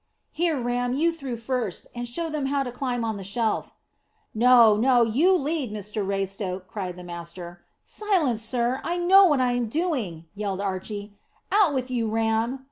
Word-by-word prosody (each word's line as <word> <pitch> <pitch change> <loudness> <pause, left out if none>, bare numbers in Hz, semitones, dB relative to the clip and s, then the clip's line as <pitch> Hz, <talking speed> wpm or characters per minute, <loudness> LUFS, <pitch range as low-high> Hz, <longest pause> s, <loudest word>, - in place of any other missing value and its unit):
"Here, 325 -3 0
Ram, 245 0 -1
you 325 +5 +2
through 275 -7 -5
first, 230 -4 -3
and 240 0 -5
show 330 +8 -3
them 300 -3 -2
how 280 0 0
to 250 - -5
climb 245 -2 -2
on 220 -2 -2
the 195 - -7
shelf." 220 +3 -1 0.6
"No, 235 -1 +6
no, 245 +2 +4
you 290 +12 +3
lead, 290 -5 -2
Mr 210 0 -4
Raystoke," 195 -1 -3
cried 185 -3 -5
the 180 - -10
master. 175 0 -8 0.2
"Silence, 340 - 0
sir! 240 +2 -1
I 345 +1 -1
know 380 +3 +7
what 295 -7 +3
I'm 245 -2 +1
doing," 235 - -2
yelled 200 -2 -3
Archy. 200 +1 -4 0.4
"Out 390 -8 +4
with 255 -1 -2
you, 235 -3 0
Ram." 225 +3 0
240 Hz, 170 wpm, -25 LUFS, 205-275 Hz, 0.6 s, know